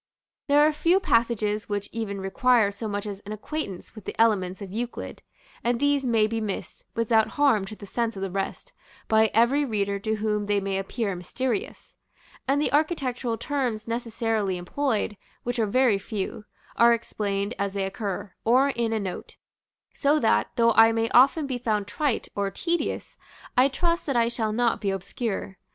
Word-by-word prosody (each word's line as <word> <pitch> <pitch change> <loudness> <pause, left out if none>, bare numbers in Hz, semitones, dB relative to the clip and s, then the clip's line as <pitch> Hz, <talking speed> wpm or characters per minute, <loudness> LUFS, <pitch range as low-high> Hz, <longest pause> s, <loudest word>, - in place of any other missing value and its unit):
There 290 0 +5
are 305 +1 +5
few 335 +5 +3
passages 225 - +1
which 205 0 -2
even 215 -3 -4
require 230 +1 +3
so 220 +2 -6
much 205 0 -3
as 200 -2 -5
an 205 +1 -7
acquaintance 215 - -5
with 215 -4 -12
the - - -6
elements 190 -5 +2
of 200 -3 -8
Euclid, 235 +4 -5 0.4
and 240 0 +1
these 285 -2 +2
may 225 -3 +3
be 225 +1 -2
missed, 205 -3 -5
without 225 -1 +3
harm 265 -9 +4
to 215 +2 -8
the 205 - -10
sense 230 +2 -2
of 195 - -5
the 195 - -3
rest, 195 - -4 0.3
by 220 0 +4
every 245 +6 +3
reader 200 -5 -1
to 220 +2 -1
whom 210 -1 -1
they 205 -1 +2
may 195 0 -2
appear 195 0 -2
mysterious; 255 - -4 0.5
and 275 +2 +2
the 295 - 0
architectural 265 -7 0
terms 250 -7 -2
necessarily 225 -4 -1
employed 215 +2 -1 0.3
(which 245 0 -2
are 220 - +2
very 240 -2 +3
few) 210 +1 -5 0.3
are 235 0 +6
explained 205 -2 -2
as 200 -1 -1
they 195 - 0
occur, 195 -1 -4
or 255 +5 +4
in 235 -4 -1
a 220 - 0
note; 190 -3 -6 0.6
so 290 +2 +2
that, 225 - +2
though 230 0 +4
I 225 +1 +7
may 225 0 0
often 270 +5 +5
be 260 -3 -3
found 215 -4 0
trite 240 +5 -1
or 200 -1 -1
tedious, 340 - -2 0.4
I 255 +1 +6
trust 335 +5 -1
that 275 - 0
I 235 -1 +3
shall 225 -2 -1
not 235 +1 +1
be 200 - 0
obscure. 195 0 -4
225 Hz, 180 wpm, -26 LUFS, 205-250 Hz, 0.6 s, I